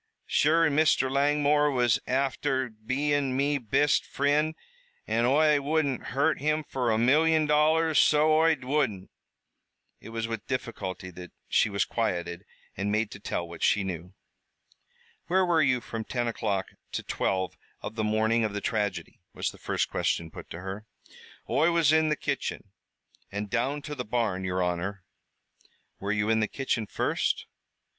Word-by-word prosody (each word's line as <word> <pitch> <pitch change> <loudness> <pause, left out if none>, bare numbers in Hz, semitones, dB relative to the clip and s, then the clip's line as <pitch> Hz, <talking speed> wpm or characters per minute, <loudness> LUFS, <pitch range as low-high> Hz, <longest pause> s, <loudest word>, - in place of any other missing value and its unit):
Sure 165 +3 +3
an' 150 -3 +1
Mr. 150 -4 +3
Langmore 145 +1 +3
was 125 -5 +2
afther 135 0 0
bein' 130 +5 -1
me 140 +1 +1
bist 130 +5 +2
frind, 150 +3 +1 0.5
an' 115 - +1
Oi 150 +2 +4
wouldn't 145 -2 0
harm 145 +3 +1
him 155 +2 0
fer 125 -3 -1
a 110 - +2
million 155 +6 +4
dollars, 155 +1 +3
so 155 +1 +4
Oi 160 0 +4
wouldn't!" 125 -9 -1 0.9
It 110 - -11
was 115 0 -3
with 115 -2 -5
difficulty 100 -8 -4
that 90 0 -10 0.2
she - - +3
was 100 -1 0
quieted 85 -6 -2 0.3
and 100 +2 -2
made 110 0 0
to 100 - -9
tell 85 -4 -3
what 85 0 -10
she 100 -1 +3
knew. 90 0 -6 1.1
"Where 185 +3 +3
were 170 -2 +3
you 130 -3 +3
from 115 -1 -5
ten 120 +1 -2
o'clock 100 -4 -2 0.2
to - - -3
twelve 95 -1 -1 0.3
of - - -5
the 110 -1 -2
morning 110 +2 +2
of 110 -2 -1
the 105 - -2
tragedy?" 100 -5 -2 0.2
was - - -2
the - - -16
first - - -1
question 80 -1 -1
put - - -10
to 85 - -7
her. 95 +3 -7 0.6
"Oi 165 - +3
was 165 -3 +3
in 160 0 +4
the 150 - +2
kitchen, 135 -8 -4 0.6
an' 100 +1 -3
down 130 +7 -1
to 150 - -6
the 130 -4 -4
barn, 110 -5 -1
yer 90 0 0
honor." 90 +2 -2 1.0
"Were 100 +1 -2
you 105 0 0
in 110 0 +3
the 110 - +1
kitchen 115 -4 -2
first." - - -1
125 Hz, 165 wpm, -28 LUFS, 105-150 Hz, 1.1 s, Oi